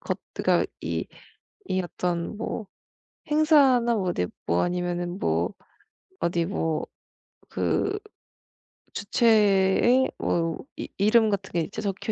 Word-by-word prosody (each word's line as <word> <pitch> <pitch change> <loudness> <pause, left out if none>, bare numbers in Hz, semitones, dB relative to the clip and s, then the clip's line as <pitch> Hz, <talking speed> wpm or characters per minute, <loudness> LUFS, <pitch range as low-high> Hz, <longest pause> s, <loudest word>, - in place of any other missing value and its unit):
것 - - -3 0.2
그니까 - - +2
이 - - -3 0.6
이 185 - +1
어떤 175 +1 -3
뭐 220 -1 -4 0.6
행사나 280 -6 +4
뭐 190 -3 -1
어디 90 - 0 0.2
뭐 85 +1 +2
아니면은 175 +1 -2
뭐 - - 0 0.7
어디 170 0 +1
뭐 165 -4 -1 0.6
그 405 +1 0 1.0
주최에 210 +3 +3
뭐 165 -1 0 0.2
이 - - -6
이름 215 +2 +4
같은 200 -2 -2
게 170 - +1
이제 200 +6 -5
적혀 200 +2 -2
195 Hz, 195 characters per minute, -26 LUFS, 175-230 Hz, 1.0 s, 행사나